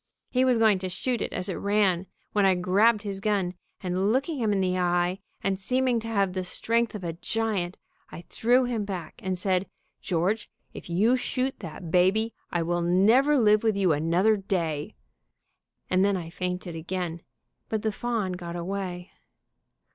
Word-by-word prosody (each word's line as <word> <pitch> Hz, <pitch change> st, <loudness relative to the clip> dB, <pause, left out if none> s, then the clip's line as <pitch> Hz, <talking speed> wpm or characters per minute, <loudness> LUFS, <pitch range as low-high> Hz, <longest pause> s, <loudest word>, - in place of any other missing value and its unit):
He 255 Hz, 0 st, +3 dB
was 255 Hz, -2 st, +4 dB
going 220 Hz, -4 st, +4 dB
to 185 Hz, 0 st, -4 dB
shoot 240 Hz, +6 st, -2 dB
it -, -, -2 dB
as 180 Hz, +1 st, -3 dB
it 190 Hz, -, -2 dB
ran, 200 Hz, -3 st, +1 dB, 0.3 s
when 205 Hz, -, +3 dB
I 190 Hz, -1 st, +5 dB
grabbed 205 Hz, +5 st, +3 dB
his 200 Hz, -2 st, -4 dB
gun, 195 Hz, -3 st, 0 dB, 0.3 s
and 185 Hz, +2 st, 0 dB
looking 275 Hz, +4 st, 0 dB
him 220 Hz, -3 st, +1 dB
in 200 Hz, -, +1 dB
the 185 Hz, -1 st, +1 dB
eye, 175 Hz, +1 st, +1 dB, 0.2 s
and 195 Hz, -1 st, 0 dB
seeming 255 Hz, +3 st, +1 dB
to 225 Hz, -, -7 dB
have 200 Hz, -4 st, +1 dB
the 185 Hz, 0 st, -2 dB
strength 230 Hz, +5 st, 0 dB
of 200 Hz, -, -6 dB
a 170 Hz, -1 st, -3 dB
giant, 195 Hz, 0 st, -1 dB, 0.3 s
I 170 Hz, -, -9 dB
threw 245 Hz, +3 st, +3 dB
him 240 Hz, -4 st, -1 dB
back, 190 Hz, -5 st, -6 dB
and 185 Hz, -1 st, -1 dB
said, 185 Hz, 0 st, 0 dB, 0.3 s
'George, 185 Hz, +5 st, 0 dB, 0.2 s
if -, -, -9 dB
you 210 Hz, +9 st, +3 dB
shoot 260 Hz, +1 st, -1 dB
that 170 Hz, -2 st, -8 dB
baby 195 Hz, +6 st, +3 dB, 0.2 s
I 175 Hz, -1 st, 0 dB
will 175 Hz, +1 st, 0 dB
never 220 Hz, +12 st, +4 dB
live 215 Hz, -3 st, +4 dB
with 220 Hz, -3 st, +1 dB
you 190 Hz, -4 st, +3 dB
another 170 Hz, +8 st, +3 dB
day,' 180 Hz, -3 st, -2 dB, 0.9 s
and 185 Hz, +1 st, +2 dB
then 200 Hz, -1 st, +2 dB
I 165 Hz, -2 st, -6 dB
fainted 180 Hz, -1 st, -4 dB
again, 170 Hz, 0 st, -4 dB, 0.5 s
but 220 Hz, -1 st, -2 dB
the 220 Hz, -, +1 dB
fawn 225 Hz, -3 st, -2 dB
got 175 Hz, -1 st, -6 dB
away. 180 Hz, 0 st, -4 dB
195 Hz, 175 wpm, -27 LUFS, 180-220 Hz, 0.9 s, I